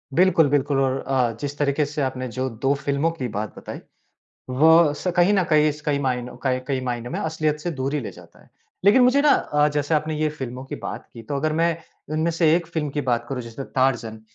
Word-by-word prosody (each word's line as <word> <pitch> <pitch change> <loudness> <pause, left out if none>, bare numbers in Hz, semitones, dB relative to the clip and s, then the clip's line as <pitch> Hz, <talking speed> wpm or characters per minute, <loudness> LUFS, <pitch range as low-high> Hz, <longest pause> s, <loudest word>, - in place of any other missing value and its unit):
बिल्कुल, 170 -4 +4
बिल्कुल 140 -1 +1
और 135 0 +1
अ, 130 -3 +2
जिस 145 0 -4
तरीक़े 145 +1 +1
से 150 0 -4
आपने 130 -1 -2
जो 130 +3 -3
2 135 +5 0
फ़िल्मों 140 +3 0
की 135 -7 -4
बात 105 0 -4
बताई, - - -8 0.7
वह 160 +3 +5
स 180 - -2
कहीं 175 +4 +4
न 190 - +3
कहीं 150 -1 +4
स 150 - -12
कई 145 -1 +1
मायनों 125 -2 -2
कई 130 -1 0
कई 135 -2 0
मायनों 120 -1 -3
में - - -3
असलियत 155 -1 -1
से 175 - -3
दूर 135 +3 -1
ही 150 - 0
ले 115 - -6
जाता - - -17
है। - - -24 0.4
लेकिन 220 +6 +6
मुझे 255 +3 +4
ना 295 - +5
अ, 150 0 +2
जैसे 145 +2 0
आपने 155 +1 0
ये 155 - +2
फ़िल्मों 130 -3 -6
की - - -6
बात - - -7
की, 115 - -10
तो 140 +5 -4
अगर 155 +2 0
मैं 165 +1 +1 0.4
इनमें 160 +2 +1
से 165 -1 +3
एक 170 - -3
फ़िल्म 160 -3 -3
की 145 - -2
बात 120 0 0
करूँ, 130 -3 -3
जैसे 115 +3 -8
तारज़न, 125 -4 -1
145 Hz, 235 wpm, -23 LUFS, 130-160 Hz, 0.7 s, लेकिन